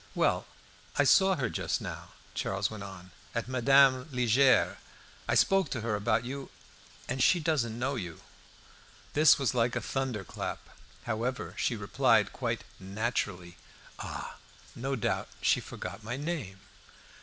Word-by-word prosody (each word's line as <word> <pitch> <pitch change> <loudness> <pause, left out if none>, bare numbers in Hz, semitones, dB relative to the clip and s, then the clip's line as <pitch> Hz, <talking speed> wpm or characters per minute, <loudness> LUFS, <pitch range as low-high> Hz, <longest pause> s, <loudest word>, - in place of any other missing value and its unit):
"Well, - - +1 0.5
I - - +5
saw 190 -1 +5
her 135 -7 -1
just - - -1
now," - - -7 0.2
Charles 95 +2 -1
went 110 -2 -7
on, 95 -2 -9 0.2
"at 115 - -1
Madame 130 +2 +4
Liegeard's. 125 +1 +3 0.5
I - - +2
spoke 195 -1 +4
to 120 - -3
her 110 -1 -1
about 110 +3 +1
you, 135 +2 -6 0.6
and 130 +1 -2
she 175 +6 +5
doesn't 145 -9 0
know 130 +3 -1
you." 90 - -6 0.9
This 155 0 +6
was 135 -4 0
like 120 0 +1
a - - +1
thunderclap. 120 -5 -3 0.5
However, 120 +3 -2
she 120 - 0
replied 100 -2 +2
quite - - -2 0.2
naturally 95 -3 -3 0.4
"Ah! - - -6 0.4
no 135 +3 -2
doubt 115 - -1
she - - +3
forgot - - -7
my 125 - -4
name." 140 - -4
120 Hz, 140 wpm, -30 LUFS, 105-135 Hz, 0.9 s, This